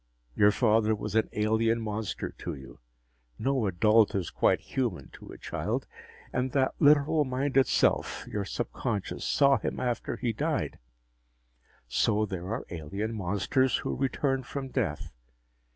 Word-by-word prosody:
Your 105 - +6
father 110 0 +3
was 105 -1 -5
an 110 0 +2
alien 110 +2 +2
monster 110 -1 -3
to - - -4
you 65 -1 -12 0.6
no 130 -5 0
adult 105 +4 +4
is 95 -4 -2
quite - - +2
human 120 -9 -3
to - - -13
a - - -10
child. - - -3 0.5
And 125 0 -1
that 135 -2 +2
literal 150 +1 +5
minded 135 0 +1
self, - - +1
your 105 - -3
subconscious, 100 +1 -3
saw 140 -1 +4
him - - -3
after 120 -2 -2
he 120 -3 -1
died. 105 - -2 1.1
So 105 - +2
there 95 -3 -5
are 115 +5 -3
alien 95 +7 -4
monsters 105 +6 +1
who - - -3
return 135 0 0
from 135 +1 -6
death. 90 - -2
110 Hz, 140 wpm, -28 LUFS, 100-130 Hz, 1.1 s, Your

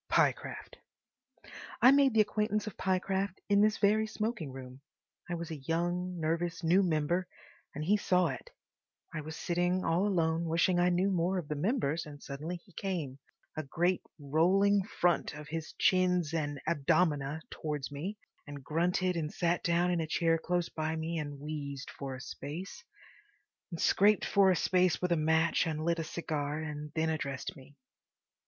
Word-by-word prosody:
Pyecraft—. - - 0 1.0
I 250 +3 +8
made 275 -3 +4
the 220 - +7
acquaintance 210 0 0
of 215 - -6
Pyecraft 190 0 -1
in 200 0 +5
this 215 0 +3
very 215 +1 +3
smoking 215 - -3
room. 130 0 -10 0.5
I 175 - -1
was 170 -1 -5
a 160 - -4
young, 175 +4 -2
nervous 165 +2 -1
new 175 +4 +4
member, 175 +1 0 0.5
and 150 +2 -3
he 205 +5 +4
saw 180 -3 +2
it. - - -7 0.6
I 155 - -3
was 155 +1 -7
sitting 175 +2 0
all 170 +5 +2
alone, 165 -3 +1
wishing 170 +2 +2
I 175 0 +4
knew 180 +3 +2
more 180 +1 +1
of 170 -5 -4
the 150 - -1
members, 165 - 0
and 145 -1 -10
suddenly 150 +6 -5
he 175 +2 -15
came, 160 -10 -4 0.4
a 155 - -2
great 175 +5 0 0.2
rolling 185 +8 +3
front 175 -4 0
of 150 0 -9 0.3
chins 180 -4 +2
and 145 -3 -2
abdomina, 150 -1 +1
towards 150 -3 -4
me, 175 +9 -5 0.3
and 145 -1 -8
grunted 180 +4 +1
and 155 -2 -2
sat 175 0 0
down 175 +1 +2
in 175 -2 +1
a 160 - -3
chair 165 +1 +2
close 175 +1 0
by 155 0 -3
me 160 +1 -2
and 145 -2 -5
wheezed 145 -2 -5
for 135 -2 -6
a 130 - -9
space, 165 +8 -7 0.9
and 170 -3 -6
scraped 205 +1 +4
for 200 -1 +4
a 185 - +4
space 180 0 +2
with 180 -1 -1
a - - +5
match 160 +2 +2
and 155 0 -2
lit 170 0 +1
a - - -1
cigar, 150 -3 -3
and 150 -1 -5
then 160 0 +1
addressed 140 -4 -4
me. 140 +2 -15
170 Hz, 170 wpm, -31 LUFS, 155-185 Hz, 1.0 s, I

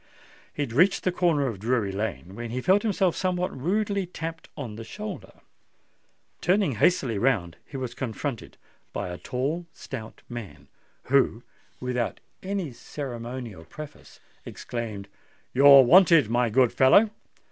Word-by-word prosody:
He 145 - -2
had 120 -5 -6
reached 180 +9 +4
the 185 - +2
corner 170 -5 +2
of 115 -7 -3
Drury 110 -2 0
Lane, 95 -3 -4
when 120 +2 -6
he 125 +3 -3
felt 190 +9 +3
himself 195 -5 +1
somewhat 180 -1 -1
rudely 200 +6 -1
tapped 165 -2 -7
on 120 -8 -6
the 115 - -7
shoulder. 210 - -7 1.1
Turning 190 -3 +2
hastily 130 - +2
round, 100 -10 +1
he 140 - -7
was 130 -2 -4
confronted 125 0 -5 0.4
by - - -3
a 90 - -6
tall 150 +7 -3
stout 115 -4 -9
man, 95 - -9 0.4
who, 130 -3 +2 0.4
without 125 -2 -2 0.2
any 190 -6 -3
ceremonial 120 - -7
preface, 150 - -11 0.2
exclaimed, 110 -5 -6 0.5
"You're 140 +1 +9
wanted, 165 - +6
my 120 0 +2
good 125 +2 +3
fellow." 200 +12 +5
130 Hz, 135 wpm, -26 LUFS, 115-170 Hz, 1.1 s, You're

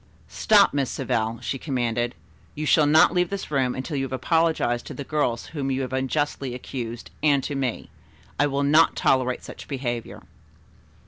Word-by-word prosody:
"Stop, 205 -2 +4
Miss 140 -3 0
Savell," 115 -2 -2
she 135 - -3
commanded. 120 -3 -1 0.4
"You 155 - -3
shall 150 0 +4
not 155 +3 +5
leave 180 -1 +1
this 200 -5 -5
room 130 -3 +1
until 130 +4 -4
you 135 - 0
have 130 - -8
apologized 130 -2 +1
to - - -7
the 140 - -5
girls 135 -5 -1
whom 140 -3 -2
you 135 0 -1
have 130 0 -5
unjustly 135 -1 -1
accused 120 -2 -6
and 145 -3 +3
to 145 - -3
me. 135 -4 -3 0.5
I 145 - +4
will 140 0 -1
not 155 +3 +4
tolerate 130 -1 +1
such - - -10
behavior." 120 -4 -4
135 Hz, 175 wpm, -24 LUFS, 125-150 Hz, 0.5 s, not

